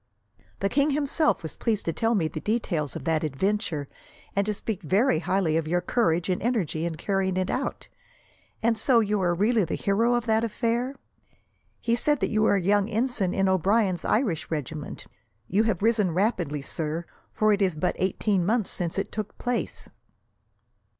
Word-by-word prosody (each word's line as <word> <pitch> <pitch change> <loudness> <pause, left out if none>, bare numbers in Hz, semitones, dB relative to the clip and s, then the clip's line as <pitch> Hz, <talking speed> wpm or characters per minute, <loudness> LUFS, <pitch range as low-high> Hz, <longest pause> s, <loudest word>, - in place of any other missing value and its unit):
"The 195 - +2
king 280 +5 +2
himself 295 - +1
was 160 - -6
pleased 220 -3 -1
to 165 - 0
tell 225 +5 +1
me 170 -6 +1
the 155 - -5
details 170 - -1
of - - -5
that 160 -1 +1
adventure, 160 0 -1 0.5
and 200 - +3
to 210 - +1
speak 205 -1 -4
very 190 - +2
highly 175 -2 +1
of 160 -1 -1
your 175 +2 +2
courage 175 -4 +1
and 185 -1 0
energy 185 -9 0
in 165 - -4
carrying 190 +1 -1
it 185 0 0
out. 265 - -3 0.8
And 225 -1 +2
so, 240 +1 +4
you 210 -2 +1
are 175 -1 +2
really 215 +4 +3
the 165 - -2
hero 230 +5 +2
of 240 -1 -1
that 220 -1 +2
affair? 235 +4 -1 0.9
He 230 - 0
said 295 +3 +2
that - - 0
you 215 -1 +2
were 215 - +4
a 195 - +1
young 205 +2 +2
ensign 225 -4 0
in 195 0 +1
O'Brien's 190 0 +2
Irish 215 - 0
regiment. 150 -1 -5 0.4
You 205 - +2
have 205 -4 0
risen 215 -7 +2
rapidly, 175 - 0
sir, 160 +3 -3 0.3
for 215 0 +3
it 200 - 0
is 185 -4 +2
but 170 +4 0
eighteen 190 0 +1
months 220 +2 +1
since 175 -1 -3
it 195 - -2
took 215 -1 -5
place." 245 -1 -2
200 Hz, 185 wpm, -26 LUFS, 170-225 Hz, 0.9 s, so